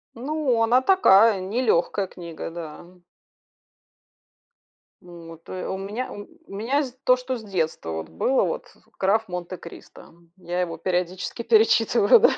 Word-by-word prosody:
Ну, 265 -1 0
она 240 +3 +4
такая, 225 - +5
нелёгкая 200 -2 0
книга, 170 -3 -8
да. 165 -1 -8 2.2
Вот. 165 -2 -12
То 185 - -6
у - - -3
ме 210 +6 -4
у 205 - -8 0.3
меня 245 +9 0 0.2
то, 255 - +5
что 255 0 -4
с 225 - -11
детства 160 - -3
было, 80 - 0
вот, - - -3 0.3
"Граф 215 +4 +2
Монте-Кристо". 180 -2 -9 0.2
Я 175 0 -3
его 170 -2 -3
периодически 180 +4 -2
перечитываю, 225 - +5
да. 485 - +6
195 Hz, 120 wpm, -24 LUFS, 175-235 Hz, 2.2 s, да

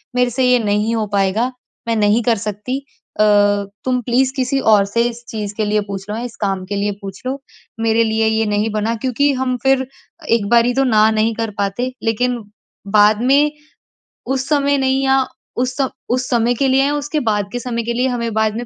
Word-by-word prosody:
मेरे 250 0 +3
से 260 +2 0
ये 250 - +5
नहीं 210 +1 0
हो 220 -1 0
पाएगा। 200 +5 +1 0.4
मैं 230 - +1
नहीं 210 +2 +3
कर 230 -2 +2
सकती। 210 +5 -4 0.4
अ, - - +6 0.6
तुम 250 -1 +1
प्लीज़ 255 +3 +1
किसी 265 +1 0
और 200 -1 +5
से 230 +4 0
इस 240 0 -10
चीज़ 210 -2 -4
के 215 - 0
लिए 210 0 +1
पूछ 195 0 -6
लो, 210 - -2
इस 240 - -8
काम 195 -2 -1
के 200 +2 -4
लिए 205 +1 0
पूछ 195 -1 -8
लो। 265 +2 -2 0.4
मेरे 225 0 +3
लिए 220 0 +1
ये 220 0 +1
नहीं 210 +1 0
बना। 220 +2 -1
क्योंकि 275 +3 +2
हम 255 -1 0
फिर 270 -1 +3 0.4
एक 225 -3 +2
बारी 240 +1 +4
तो 270 - +3
ना 220 -2 +4
नहीं 220 +1 +1
कर 225 -2 -3
पाते, 200 +6 -1
लेकिन 245 +2 0 0.6
बाद 210 +2 +5
में 285 +3 +4 0.8
उस 265 0 -1
समय 285 -1 +2
नहीं 265 0 +1
या 265 0 +3 0.3
उस 250 0 -1 0.3
उस 250 +1 -1
समय 240 -1 +2
के 270 +3 +1
लिए 265 +1 +3
या 290 +1 0
उसके 295 +1 -2
बाद 205 -1 -1
के 245 - -2
समय 235 -1 -3
के 235 +1 -2
लिए 250 +2 +1
हमें 235 -2 -2
बाद 220 0 +1
में 245 - -4
230 Hz, 210 wpm, -18 LUFS, 210-255 Hz, 0.8 s, अ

